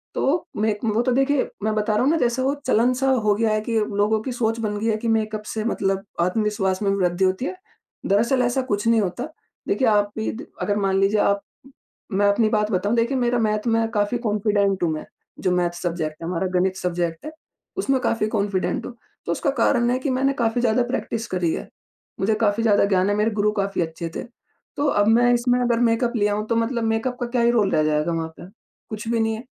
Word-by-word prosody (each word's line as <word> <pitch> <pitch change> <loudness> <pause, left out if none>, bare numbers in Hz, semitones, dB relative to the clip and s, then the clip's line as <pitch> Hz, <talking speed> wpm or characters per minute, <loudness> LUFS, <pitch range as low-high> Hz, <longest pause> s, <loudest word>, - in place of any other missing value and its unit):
तो 315 +5 +1 0.2
मे 215 0 +2
वो 220 +1 +1
तो 255 - 0
देखिए 270 +2 +2
मैं 215 0 +1
बता 215 0 0
रहा 210 - +2
हूँ 275 - +3
ना 330 - +2
जैसे 245 -2 +1
वो 270 +2 +1
चलन 245 0 +3
सा 270 +2 0 0.2
हो 210 - +4
गया 225 +1 +1
है 215 - 0
कि 225 +1 -2
अब 210 -1 -1
लोगों 210 +2 +2
की 260 - -3
सोच 230 -2 -1
बन 210 -2 -2
गई 220 - -3
है 215 -1 +1
कि 230 - -4
मेकअप 215 -1 0
से 220 - -3
मतलब 195 -3 -1 0.2
आत्मविश्वास 195 0 0
में 200 - +1
वृद्धि 185 -1 +1
होती 190 +7 0
है, 370 - -3 0.5
दरअसल 235 +6 +2
ऐसा 245 +2 +1
कुछ 210 -4 -2
नहीं 230 -1 +4
होता। 200 +7 -3 0.4
देखिए, 260 - +1
आप 205 -1 +3
भी 220 - -1
दि 240 - -8 0.2
अगर 205 0 0
मान 195 -1 +1
लीजिए 200 +2 +2
आप 200 0 +2 0.7
मैं 200 +1 +2
अपनी 215 +2 +2
बात 210 0 0
बताऊँ, 200 +4 +1
देखिए 235 +3 +1
मेरा 245 -1 +1
मैथ 215 0 0
में 225 0 +2
काफ़ी 210 +2 0
कॉन्फिडेंट 205 -3 +1
हूँ 165 - +2
मैं, 155 - -4 0.3
जो 185 - 0
मैथ 175 -1 +2
सब्जेक्ट 160 -3 -3
है, - - -4
हमारा 180 +1 -1
गणित 190 +1 0
सब्जेक्ट 175 -3 -2
है, 310 - -5 0.5
उसमें 275 -8 +1
काफ़ी 230 -3 0
कॉन्फिडेंट 200 -3 -1
हूँ। 240 - -8 0.3
तो - - -1
उसका 170 - 0
कारण 240 -2 +3
है 255 - 0
कि 275 - -2
मैंने 265 +1 +1
काफ़ी 225 +2 +1
ज़्यादा 240 +1 +2
प्रैक्टिस 235 -3 -3
करी 180 -3 0
है, - - -5 0.5
मुझे 195 +3 +2
काफ़ी 205 +2 +1
ज़्यादा 205 -3 +4
ज्ञान 190 -1 +2
है, 205 - +1
मेरे 210 +2 +1
गुरु 210 +1 +2
काफ़ी 195 -2 -2
अच्छे 165 0 -4
थे। - - -4 0.5
तो 290 - +1
अब 205 -5 +2
मैं 240 +2 +5
इसमें 245 +1 +2
अगर 240 -1 +1
मेकअप 235 +1 +2
लिया 205 -1 +2
हूँ 210 +1 -2
तो 230 - 0
मतलब 230 +1 0
मेकअप 225 +3 -1
का - - 0
क्या 240 0 0
ही 235 0 +4
रोल 215 -5 +2
रह 155 - +2
जाएगा 150 +2 +1
वहाँ 165 -1 -2
पे? 175 - -10 0.4
कुछ 215 +1 -6
भी 230 -1 +1
नहीं 225 0 +1
है। 225 - -8
215 Hz, 235 wpm, -23 LUFS, 200-240 Hz, 0.7 s, मैं